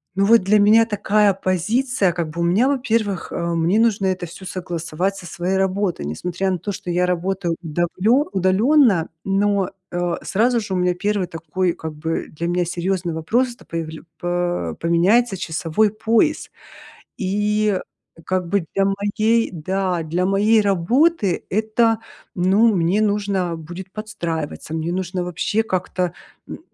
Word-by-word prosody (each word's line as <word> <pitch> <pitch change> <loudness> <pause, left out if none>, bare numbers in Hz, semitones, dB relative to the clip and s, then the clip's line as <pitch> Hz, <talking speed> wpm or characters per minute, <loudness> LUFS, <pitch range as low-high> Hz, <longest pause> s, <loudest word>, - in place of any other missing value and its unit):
ну, 195 - +2
вот 230 +2 +6
для 210 +2 +4
меня 220 +2 +6
такая 210 -1 +2
позиция 195 +3 0
как 170 -3 -3
бы 170 - -4
у - - +2
меня, 195 +10 +3
во-первых, 225 -8 -1
э, 170 0 -2
мне 170 +6 +2
нужно 210 -4 +2
это 185 -1 -1
всё 180 +3 -11
согласовать 175 +1 -3
со 180 - -9
своей 180 +3 -2
работой, 190 - 0
несмотря 180 - -2
на 180 - 0
то, 205 +5 -4
что 180 - -7
я 180 +1 +2
работаю 180 -1 -1
удавленно 180 - +1
удалённо, 195 - +3
но, 195 -1 +1 0.2
э, 175 -1 -1
сразу 235 +4 +2
же 200 -3 -5
у - - 0
меня 180 0 +2
первый 200 0 -1
такой, 170 +2 -2
как 160 -2 -7
бы 160 +2 -3
для 170 +3 -4
меня 175 0 0
серьёзный 175 0 -2
вопрос- 235 +11 0
это - - -19
появля 160 -1 -5 0.2
по 175 - -2
поменяется 195 +6 +3
часовой 170 +5 0
пояс, 225 +8 +1 0.7
и 210 +1 +1 0.5
как 185 -2 -1
бы 195 -3 0
для 195 - +2
моей, 215 +3 +1
да, 180 +1 -1
для 175 +4 -1
моей 210 +3 +4
работы 205 - +2
это, 220 +2 +1 0.4
ну, 200 +5 +3
мне 180 +4 +2
нужно 200 -5 0
будет 175 +4 -9
подстраиваться. 170 -8 -5
Мне 160 +1 -2
нужно 180 0 -2
вообще 180 +5 -1
как-то, 185 -3 -2 0.3
м, - - -8
190 Hz, 155 wpm, -21 LUFS, 175-210 Hz, 0.7 s, вот